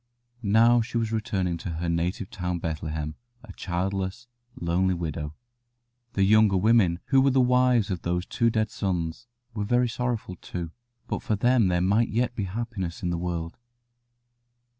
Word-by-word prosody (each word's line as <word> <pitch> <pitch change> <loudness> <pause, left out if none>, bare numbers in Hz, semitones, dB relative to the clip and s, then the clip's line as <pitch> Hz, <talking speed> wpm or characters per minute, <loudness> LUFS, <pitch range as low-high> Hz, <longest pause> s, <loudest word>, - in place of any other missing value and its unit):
Now 115 +3 +5
she 115 +1 -3
was 115 -1 0
returning 95 -6 -1
to 85 - -6
her 85 +2 -3
native 90 +5 -1
town 90 -1 -2
of 85 - -6
Bethlehem, 75 -1 -3 0.3
a - - -11
childless, 95 +4 -3 0.3
lonely 90 +2 +1
widow. 75 -3 -4 0.8
The 100 - +2
younger 105 -1 +5
women, 95 -4 +3
who 135 -1 +5
were 135 - +4
the 135 0 +3
wives 125 -4 +3
of 90 - -3
those 90 +1 -1
two 115 - +1
dead 110 -1 0
sons, 90 +3 -3 0.3
were 105 -2 -2
very 120 +3 +2
sorrowful 115 -6 -3
too, 85 -2 -6 0.3
but - - -3
for 110 - 0
them 120 0 +3
there 90 -1 +1
might 105 +6 +2
yet 120 +2 0
be 105 -4 -3
happiness 95 -3 -4
in 90 - 0
the 85 - -1
world. 85 -1 -4
95 Hz, 165 wpm, -26 LUFS, 85-115 Hz, 0.8 s, Now